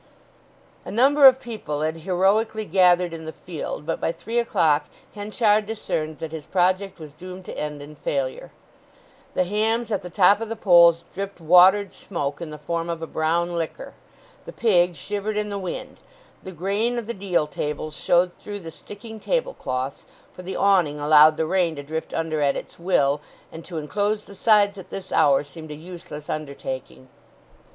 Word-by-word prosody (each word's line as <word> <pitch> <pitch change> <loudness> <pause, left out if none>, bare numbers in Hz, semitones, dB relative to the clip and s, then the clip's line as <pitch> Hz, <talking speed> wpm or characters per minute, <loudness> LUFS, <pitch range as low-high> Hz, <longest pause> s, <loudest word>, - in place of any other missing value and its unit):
A - - -9
number 275 +5 +6
of 260 0 +6
people 215 - -5
had 160 +1 -1
heroically 195 +6 +1
gathered 180 -1 +3
in 160 -1 -7
the 160 - -5
field 160 -3 -6
but 165 - -3
by - - +1
three 230 +7 -3
o'clock 170 -10 +2 0.3
Henchard 210 0 +1
discerned 160 -8 -3
that 160 -1 -6
his 160 -2 -7
project 185 +1 +1
was 155 -4 -11
doomed 185 +3 -10
to - - -7
end 150 -1 -5
in 150 +1 -12
failure. 135 -3 -3 0.8
The - - +3
hams 220 +4 0
at 205 - 0
the 180 - -8
top 200 +4 +4
of 225 - -4
the 225 - -3
poles 170 -5 +5
dripped 200 0 -5
watered 180 +4 +5
smoke 145 -5 -4
in 170 - -5
the 150 - -8
form 165 +3 -3
of 165 -1 -4
a - - -1
brown 170 +2 0
liquor, 165 -2 -4 0.5
the - - -6
pig 180 -6 +2
shivered 205 +7 -4
in 210 0 -1
the 200 -1 -3
wind, 185 -2 -6 0.4
the 190 - -8
grain 200 +8 -1
of 235 - -3
the 235 - -4
deal 185 -6 0
tables 150 +1 -4
showed 175 +1 +2
through 205 -1 -7
the 165 -2 -8
sticking 220 +5 -11
tablecloths, 140 - -3 0.3
for - - -10
the 185 +1 -6
awning 175 -7 +2
allowed 150 +1 +6
the 160 - 0
rain 175 -1 +1
to 145 - -7
drift 160 +3 -5
under 160 -2 -2
at 140 -1 +2
its - - -8
will, 145 -5 +2 0.3
and 165 - -9
to 170 - -7
enclose 205 +7 -1
the - - -13
sides 205 0 +3
at 185 0 -11
this 195 - -8
hour 140 -1 +4
seemed 155 +2 -11
a 150 - -6
useless 155 -2 -10
undertaking. 130 - -6
175 Hz, 180 wpm, -23 LUFS, 155-205 Hz, 0.8 s, number